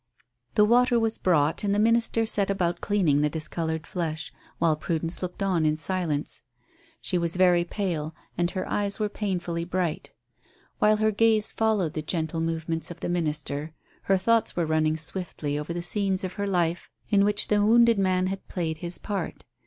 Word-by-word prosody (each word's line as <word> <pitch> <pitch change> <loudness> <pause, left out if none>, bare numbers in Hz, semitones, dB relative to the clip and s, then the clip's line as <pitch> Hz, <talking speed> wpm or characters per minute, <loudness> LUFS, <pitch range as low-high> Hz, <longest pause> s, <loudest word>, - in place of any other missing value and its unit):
The 210 - +6
water 245 +2 +4
was 225 -1 0
brought, 155 -2 +2
and 200 -1 +1
the - - +1
minister 230 +1 +3
set 205 -3 +2
about 175 -3 -1
cleaning 175 -9 +2
the 150 - +2
discoloured 160 +1 -3
flesh, 160 -3 -4 0.2
while 165 -2 +2
Prudence 165 +2 -3
looked 180 +2 -4
on 185 -4 +1
in 155 0 +2
silence. 160 -4 -1 0.6
She 180 - 0
was 170 0 -2
very 180 -1 +4
pale, 170 -5 -3 0.2
and 175 0 +1
her 185 -1 -4
eyes 205 0 -2
were 210 -1 0
painfully 180 -5 -3
bright. 175 -2 -2 0.7
While 215 0 +4
her 215 0 +2
gaze 220 0 +3
followed 210 -8 0
the 155 - -3
gentle 160 0 -2
movements 165 0 -2
of 175 -1 -10
the - - -2
minister, 150 -2 -2 0.3
her 195 - +3
thoughts 230 +4 +1
were 170 - 0
running 155 0 +1
swiftly 160 -3 -4
over 150 +3 -5
the 170 0 -3
scenes 195 0 +2
of 185 -1 -4
her 200 -1 -3
life 175 -3 0 0.2
in 200 -1 +5
which 205 0 +1
the 205 -1 +3
wounded 230 0 +5
man 185 -1 +2
had 195 +1 -4
played 160 -3 -3
his 175 +1 0
part. 200 -5 -5
180 Hz, 180 wpm, -26 LUFS, 160-205 Hz, 0.7 s, The